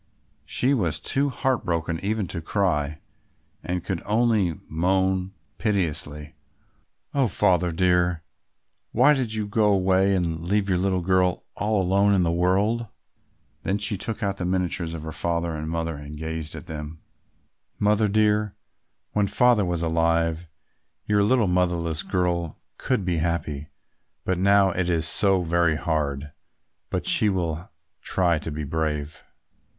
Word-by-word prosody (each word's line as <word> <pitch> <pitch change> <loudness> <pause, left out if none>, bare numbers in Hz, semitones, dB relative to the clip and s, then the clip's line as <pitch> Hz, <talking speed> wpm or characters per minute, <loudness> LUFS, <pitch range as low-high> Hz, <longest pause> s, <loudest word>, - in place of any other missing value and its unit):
She 130 +3 +1
was 90 - 0
too 140 +1 +1
heartbroken 85 -12 -1
even 105 -1 -2
to 85 - -4
cry 80 -5 -1 0.6
and 90 0 -3
could 95 -4 -3
only 105 -6 +2
moan 95 +3 0 0.2
piteously, 75 -8 -1 0.8
"Oh, 135 -3 +2
Father 90 -4 +2
dear, 90 -1 +1 0.7
why 130 +6 +5
did 125 -6 -2
you 110 -1 -1
go 105 +1 +1
away 95 0 +3
and 85 -3 -1
leave 100 +4 0
your 90 -2 +2
little 95 -1 0
girl 90 0 +1
all 105 +1 0
alone 100 +2 +3
in 90 - +3
the 85 - +1
world?" 100 +7 +1 0.9
She 105 +1 -2
then - - -8
took 110 +1 -3
out 100 -1 -1
the 95 - -4
miniatures 90 -2 -1
of 80 - -7
her 80 - -5
father 85 0 -1
and 80 0 -4
mother 80 -1 -2
and 75 +1 -9
gazed 80 0 -4
at - - -8
them. 75 0 -8 0.7
"Mother 105 +1 +2
dear, 105 0 +1 0.6
when 105 -1 +1
Father 120 0 +3
was 85 -1 -2
alive, 85 0 +1 0.6
your 105 -1 +2
little 115 +2 +3
motherless 85 -3 0
girl 85 -3 -1 0.2
could 125 -8 -1
be 90 -2 0
happy; 80 -3 -2 0.6
but 95 -1 0
now 100 0 +4
it 90 0 -1
is 80 -2 +2
so 95 +1 +4
very 85 -1 +2
hard; 75 -3 -2 0.6
but - - -2
she 105 - +4
will 85 -3 -2 0.3
try 85 -4 +1
to 80 - -5
be 75 0 -4
brave." 75 0 -3
90 Hz, 145 wpm, -24 LUFS, 80-100 Hz, 0.9 s, why